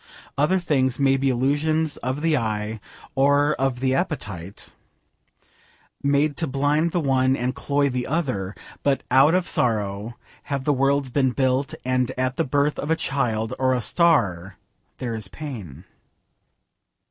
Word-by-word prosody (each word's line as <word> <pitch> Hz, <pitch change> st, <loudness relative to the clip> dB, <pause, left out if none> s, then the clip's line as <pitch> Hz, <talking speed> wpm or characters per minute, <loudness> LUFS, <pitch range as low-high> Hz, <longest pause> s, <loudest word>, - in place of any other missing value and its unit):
Other 150 Hz, +7 st, +2 dB
things 135 Hz, -8 st, +1 dB
may 135 Hz, -1 st, +3 dB
be 135 Hz, 0 st, +1 dB
illusions 145 Hz, +5 st, +1 dB
of 130 Hz, +4 st, -3 dB
the 165 Hz, -2 st, +3 dB
eye 110 Hz, -3 st, -2 dB, 0.3 s
or 145 Hz, +2 st, +3 dB, 0.2 s
the 130 Hz, +1 st, -1 dB
appetite, 105 Hz, -, -4 dB, 1.3 s
made 140 Hz, +1 st, +2 dB
to 165 Hz, -, -1 dB
blind 145 Hz, +5 st, +1 dB
the 175 Hz, -, 0 dB
one 130 Hz, -3 st, +2 dB
and 125 Hz, 0 st, -1 dB
cloy 140 Hz, 0 st, 0 dB
the 125 Hz, -2 st, -2 dB
other, 130 Hz, -, -2 dB, 0.3 s
but 140 Hz, -1 st, +1 dB
out 135 Hz, +6 st, +6 dB
of 185 Hz, -1 st, +1 dB
sorrow 105 Hz, -1 st, -1 dB, 0.3 s
have 140 Hz, -2 st, -3 dB
the 145 Hz, -, +2 dB
worlds 135 Hz, 0 st, +1 dB
been 130 Hz, -1 st, +2 dB
built, 130 Hz, +1 st, 0 dB
and 130 Hz, -1 st, +1 dB
at 130 Hz, 0 st, 0 dB
the -, -, +1 dB
birth 145 Hz, +2 st, 0 dB
of 145 Hz, -, -4 dB
a 160 Hz, -, +3 dB
child 120 Hz, -7 st, -1 dB
or 130 Hz, -1 st, +2 dB
a -, -, 0 dB
star 105 Hz, -, +1 dB, 0.4 s
there 120 Hz, -3 st, -4 dB
is 110 Hz, -3 st, -5 dB
pain. 100 Hz, -, -8 dB
135 Hz, 145 wpm, -23 LUFS, 120-145 Hz, 1.3 s, out